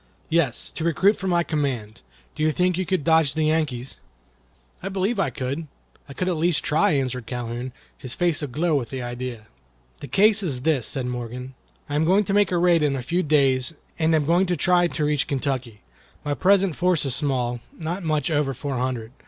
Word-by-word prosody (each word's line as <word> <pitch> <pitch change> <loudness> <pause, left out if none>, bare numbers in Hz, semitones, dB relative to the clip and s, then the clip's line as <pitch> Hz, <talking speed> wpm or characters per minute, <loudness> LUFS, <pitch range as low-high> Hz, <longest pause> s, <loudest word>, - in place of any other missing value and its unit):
"Yes, 160 -7 +1
to 160 - -5
recruit 170 +6 +3
for 190 - -5
my 175 -2 +2
command. 135 -9 -3 0.3
Do - - -7
you 155 0 +3
think 180 +3 +1
you 185 0 -2
could 185 -6 0
dodge 160 -1 +3
the 155 - +1
Yankees?" 150 -5 -1 0.8
"I 195 - -4
believe 195 +3 -1
I 170 - +2
could. 135 +5 -4 0.4
I - - -7
could 180 - -2
at 180 -3 0
least 165 0 +2
try," 155 +2 +2
answered 130 -4 -2
Calhoun, 120 +1 -4 0.3
his 125 -2 -5
face 175 -4 +1
aglow 150 +4 -1
with 130 -6 0
the 130 -2 -5
idea. 120 -2 -5 0.5
"The - - -8
case 210 - +4
is 140 -10 -2
this," 145 -7 +1
said 130 -2 -2
Morgan: 125 +1 -5 0.3
"I 145 - -6
am 150 +2 +2
going 190 +5 +4
to 195 - -2
make 205 -3 +3
a 180 - +2
raid 170 -1 +4
in 145 -2 +2
a 130 - -4
few 170 +7 0
days, 140 -2 +2 0.2
and 160 0 +3
am 150 -2 +1
going 175 +5 +3
to 175 -1 0
try 175 -1 +3
to 155 -3 -2
reach 150 -2 +1
Kentucky. 130 -6 -3 0.4
My 145 - 0
present 190 +1 +3
force 180 -4 +2
is 135 - 0
small—not 135 +6 -2
much 155 -2 0
over 145 -3 0
four 135 0 -3
hundred. 125 -3 -3
150 Hz, 200 wpm, -24 LUFS, 130-175 Hz, 0.8 s, case